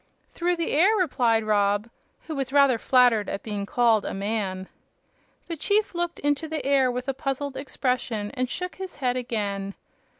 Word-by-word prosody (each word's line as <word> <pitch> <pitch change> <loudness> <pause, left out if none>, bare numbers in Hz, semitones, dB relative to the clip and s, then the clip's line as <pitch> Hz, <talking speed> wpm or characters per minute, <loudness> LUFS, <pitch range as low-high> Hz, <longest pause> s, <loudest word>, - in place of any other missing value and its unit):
"Through 350 +1 0
the 335 -1 -2
air," 375 +9 +4
replied 245 - +2
Rob, 205 0 +1 0.4
who 320 - -5
was 270 -1 -3
rather 280 -4 +4
flattered 245 -5 +4
at 195 - -4
being 205 -2 -4
called 230 -3 +3
a - - -4
"man." 195 -2 -2 0.8
The 335 - -4
chief 410 +7 +1
looked 345 0 -2
into 290 +2 0
the 310 -2 -4
air 275 -2 +3
with 250 +1 -4
a 270 - 0
puzzled 275 0 -3
expression 250 -6 -2
and 255 -2 -2
shook 360 +7 -5
his 380 -1 -7
head 250 -2 0
again. 205 -5 -3
255 Hz, 170 wpm, -25 LUFS, 215-290 Hz, 0.8 s, air